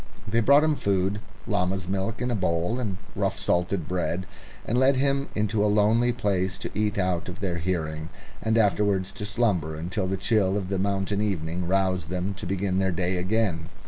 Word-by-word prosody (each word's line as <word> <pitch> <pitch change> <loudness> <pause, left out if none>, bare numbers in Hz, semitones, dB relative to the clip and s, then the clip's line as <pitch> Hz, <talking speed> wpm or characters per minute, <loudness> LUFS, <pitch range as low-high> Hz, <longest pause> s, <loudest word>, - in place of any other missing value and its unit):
They 115 +2 +2
brought 140 +6 +6
him 155 -1 +2
food 100 -2 0 0.3
llama's 90 0 0
milk 100 +5 -2
in 125 - 0
a - - +1
bowl, 90 +4 0
and 105 -7 -2 0.2
rough - - 0
salted 90 -1 +1
bread 90 0 -1 0.4
and 120 +3 +1
led 130 +1 +5
him 140 +1 +1
into 105 0 +1
a 105 - +3
lonely 110 +4 +3
place, 100 -6 0
to - - -5
eat 105 -1 0
out 90 -3 0
of 90 - -7
their 90 -3 -2
hearing, 80 -2 -2 0.3
and 110 +1 +1
afterwards 100 -3 +2
to 105 - -5
slumber 100 -8 0
until 85 +4 -2
the 95 +1 -1
chill 95 0 +2
of 95 -3 -3
the 95 -1 -1
mountain 100 +1 0
evening 90 -4 -2
roused 95 -3 +1
them 90 +2 -2
to 95 - -5
begin 95 0 0
their 95 0 +2
day 90 +1 0
again. 90 -3 0
95 Hz, 190 wpm, -26 LUFS, 90-105 Hz, 0.4 s, brought